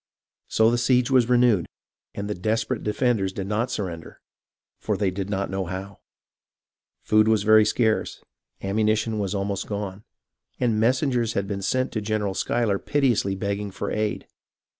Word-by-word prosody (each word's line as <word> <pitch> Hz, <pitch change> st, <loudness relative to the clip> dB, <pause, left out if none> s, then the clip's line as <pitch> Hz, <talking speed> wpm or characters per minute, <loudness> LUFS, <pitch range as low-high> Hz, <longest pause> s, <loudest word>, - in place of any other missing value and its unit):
So 110 Hz, +1 st, +3 dB
the 120 Hz, -, +1 dB
siege 125 Hz, +1 st, +2 dB
was 125 Hz, -2 st, +4 dB
renewed, 120 Hz, -7 st, +3 dB, 0.5 s
and 100 Hz, 0 st, -4 dB
the 105 Hz, -, -2 dB
desperate 110 Hz, +5 st, -1 dB
defenders 105 Hz, -3 st, 0 dB
did 95 Hz, 0 st, -5 dB
not 110 Hz, +5 st, -1 dB
surrender, 85 Hz, -8 st, -5 dB, 0.6 s
for -, -, -1 dB
they 100 Hz, -3 st, +1 dB
did 95 Hz, +1 st, -4 dB
not 100 Hz, -1 st, -2 dB
know 95 Hz, 0 st, -2 dB
how. 95 Hz, +2 st, -7 dB, 1.0 s
Food 110 Hz, 0 st, +4 dB
was 110 Hz, -2 st, +3 dB
very 110 Hz, 0 st, +6 dB
scarce, 110 Hz, 0 st, 0 dB, 0.4 s
ammunition 110 Hz, +2 st, 0 dB
was 100 Hz, 0 st, -2 dB
almost 100 Hz, 0 st, -2 dB
gone, 100 Hz, -1 st, -5 dB, 0.6 s
and 115 Hz, -3 st, +1 dB
messengers 125 Hz, -1 st, +1 dB
had 100 Hz, 0 st, -1 dB
been 100 Hz, -1 st, -3 dB
sent 130 Hz, +6 st, 0 dB
to 110 Hz, -, -2 dB
General 105 Hz, -2 st, -1 dB
Schuyler 105 Hz, 0 st, 0 dB
piteously 120 Hz, -9 st, +1 dB
begging 100 Hz, +1 st, -3 dB
for 95 Hz, -, -5 dB
aid. 105 Hz, -1 st, -2 dB
105 Hz, 155 wpm, -24 LUFS, 100-115 Hz, 1.0 s, very